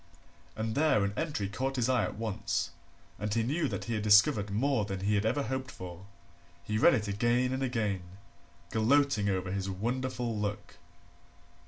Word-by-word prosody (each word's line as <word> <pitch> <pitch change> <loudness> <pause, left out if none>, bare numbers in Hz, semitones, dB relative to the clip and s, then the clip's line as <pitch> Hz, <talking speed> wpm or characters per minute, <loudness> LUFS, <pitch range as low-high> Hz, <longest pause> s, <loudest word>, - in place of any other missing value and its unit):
And 110 0 -2
there 145 -6 +3
an 100 0 -1
entry 145 -9 -2
caught 130 +7 -2
his 125 -2 +1
eye 130 -1 +2
at - - -6
once 110 -2 -2 0.5
and 105 0 -2
he 115 +2 +1
knew 150 +6 0
that - - -4
he 115 - -3
had 110 - -1
discovered 105 0 +5
more 115 +3 +1
than 95 -2 -4
he 100 +2 +1
had 105 +1 +2
ever 140 +5 +1
hoped 130 +3 -3
for. 90 -3 -9 0.6
He 110 0 -1
read - - +6
it 105 -1 -2
again 120 +5 +1
and 130 - -2
again, 110 -7 -1 0.7
gloating 115 -1 +3
over 95 -1 -1
his 95 0 -2
wonderful 120 +4 -2
luck. 105 0 -4
110 Hz, 175 wpm, -30 LUFS, 100-130 Hz, 0.7 s, read